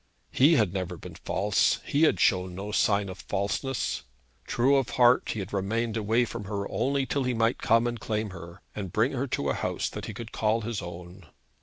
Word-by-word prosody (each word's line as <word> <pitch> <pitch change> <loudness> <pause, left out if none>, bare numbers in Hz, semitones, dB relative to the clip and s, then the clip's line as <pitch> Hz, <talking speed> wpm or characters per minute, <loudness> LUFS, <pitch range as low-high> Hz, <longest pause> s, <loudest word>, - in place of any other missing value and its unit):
He 150 +6 +5
had 105 - +2
never 90 -2 -3
been - - -10
false. 100 +2 +1
He 145 - 0
had - - -2
shown 90 -3 +2
no 100 +3 -5
sign 100 -1 +2
of 95 -1 -8
falseness. 100 +5 -2 0.5
True 135 +4 +3
of 135 -5 0
heart, 125 0 +5
he - - -2
had 100 0 -5
remained 110 +4 -1
away 110 +2 +2
from 115 -2 -6
her 100 -1 -3
only 135 +7 0
till 140 +1 -1
he 125 -1 0
might 115 +1 +1
come 115 -1 +3
and 120 -1 -2
claim 110 -2 -2
her, 85 -1 -11
and 95 -4 -5
bring 110 +8 +2
her 135 +1 -2
to 70 - -1
a - - 0
house - - -2
that - - -6
he - - -6
could 115 -2 -7
call 110 +1 +1
his 110 -2 -3
own. 90 0 -9
110 Hz, 210 wpm, -27 LUFS, 95-120 Hz, 0.5 s, He